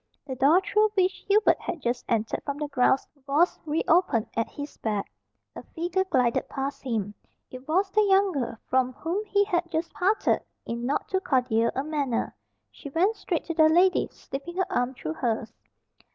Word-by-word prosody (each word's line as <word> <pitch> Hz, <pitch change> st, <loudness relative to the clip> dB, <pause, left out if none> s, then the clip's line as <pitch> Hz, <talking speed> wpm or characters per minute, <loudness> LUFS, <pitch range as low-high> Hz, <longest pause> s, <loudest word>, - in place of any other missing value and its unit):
The 265 Hz, -, -5 dB
door 290 Hz, +8 st, +5 dB
through 425 Hz, +2 st, +2 dB
which 375 Hz, -1 st, +3 dB
Hubert 420 Hz, +2 st, +4 dB
had 340 Hz, -, -4 dB
just 245 Hz, -2 st, -2 dB
entered 225 Hz, -1 st, 0 dB
from 280 Hz, -1 st, -4 dB
the 300 Hz, 0 st, -3 dB
grounds 270 Hz, -1 st, +2 dB, 0.2 s
was 305 Hz, +6 st, +2 dB
re 305 Hz, +2 st, 0 dB
opened 320 Hz, -, +3 dB
at 230 Hz, -, 0 dB
his 285 Hz, 0 st, -8 dB
back. 210 Hz, -3 st, -3 dB, 0.4 s
A -, -, -7 dB
figure 350 Hz, +3 st, -2 dB
glided 255 Hz, -9 st, +1 dB
past 270 Hz, +1 st, -4 dB
him. 215 Hz, -5 st, -2 dB, 0.4 s
It 255 Hz, +2 st, -10 dB
was 380 Hz, +5 st, +1 dB
the 430 Hz, -, +4 dB
young 395 Hz, -1 st, +4 dB
girl 265 Hz, -7 st, -3 dB
from 255 Hz, 0 st, +1 dB
whom 345 Hz, -, -3 dB
he 405 Hz, -1 st, +2 dB
had 345 Hz, -4 st, -1 dB
just 330 Hz, +1 st, -3 dB
parted 400 Hz, +4 st, +1 dB, 0.2 s
in 235 Hz, +1 st, -3 dB
not 285 Hz, -, -1 dB
too 380 Hz, -, 0 dB
cordial 245 Hz, -, +1 dB
a 270 Hz, -, -1 dB
manner. 285 Hz, -6 st, -2 dB, 0.4 s
She 285 Hz, -, -10 dB
went 370 Hz, +10 st, +2 dB
straight 345 Hz, -7 st, -2 dB
to 335 Hz, -, -3 dB
the 315 Hz, -1 st, +5 dB
lady, 360 Hz, +3 st, +4 dB
slipping 305 Hz, +6 st, -8 dB
her 375 Hz, -, +2 dB
arm 245 Hz, -2 st, 0 dB
through 155 Hz, -9 st, -4 dB
hers. 225 Hz, +4 st, -2 dB
295 Hz, 185 wpm, -26 LUFS, 250-365 Hz, 0.4 s, door